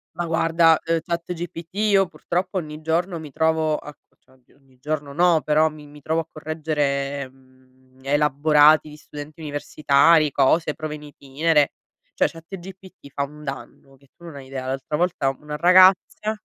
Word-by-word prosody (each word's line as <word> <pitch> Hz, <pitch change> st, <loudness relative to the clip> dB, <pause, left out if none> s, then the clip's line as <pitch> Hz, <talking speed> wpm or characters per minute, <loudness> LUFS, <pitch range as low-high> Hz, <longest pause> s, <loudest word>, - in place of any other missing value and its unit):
Ma 175 Hz, -, -3 dB
guarda, 165 Hz, 0 st, +3 dB
uhm, 165 Hz, 0 st, 0 dB
ChatGPT 170 Hz, -1 st, -5 dB
io 200 Hz, -3 st, +3 dB
purtroppo 180 Hz, +2 st, -3 dB
ogni 155 Hz, -2 st, -6 dB
giorno 170 Hz, +2 st, -1 dB
mi 150 Hz, -3 st, -10 dB
trovo 160 Hz, 0 st, +1 dB
a 150 Hz, -, -10 dB, 0.3 s
cioè 130 Hz, -, -27 dB
oddio, 130 Hz, +1 st, -29 dB
ogni 135 Hz, -2 st, -28 dB
giorno 145 Hz, -1 st, -4 dB
no, 170 Hz, -1 st, +3 dB
però 155 Hz, +1 st, +2 dB
mi 150 Hz, -1 st, -13 dB
mi 145 Hz, 0 st, -15 dB
trovo 160 Hz, +3 st, -1 dB
a 160 Hz, -, -12 dB
correggere, 145 Hz, -3 st, -2 dB
mhmm, 130 Hz, 0 st, -27 dB
elaborati 150 Hz, +2 st, +4 dB
di 150 Hz, -, -12 dB
studenti 150 Hz, +2 st, -11 dB
universitari, 150 Hz, +1 st, +2 dB
cose, 150 Hz, +4 st, +2 dB
prove 155 Hz, -1 st, -6 dB
in 150 Hz, -, -12 dB
itinere, 145 Hz, +1 st, 0 dB, 0.4 s
cioè -, -, +3 dB
ChatGPT 185 Hz, -1 st, -12 dB
fa 140 Hz, -, -1 dB
un 150 Hz, +2 st, -9 dB
danno 135 Hz, 0 st, -9 dB
che 140 Hz, 0 st, -26 dB
tu 170 Hz, -, -21 dB
non 160 Hz, -4 st, -10 dB
hai 135 Hz, -1 st, -10 dB
idea. 130 Hz, -1 st, -6 dB
L'altra 135 Hz, +3 st, -3 dB
volta 170 Hz, -6 st, 0 dB
una 150 Hz, 0 st, -7 dB
ragazza 185 Hz, +5 st, +4 dB
155 Hz, 165 wpm, -22 LUFS, 140-165 Hz, 0.4 s, elaborati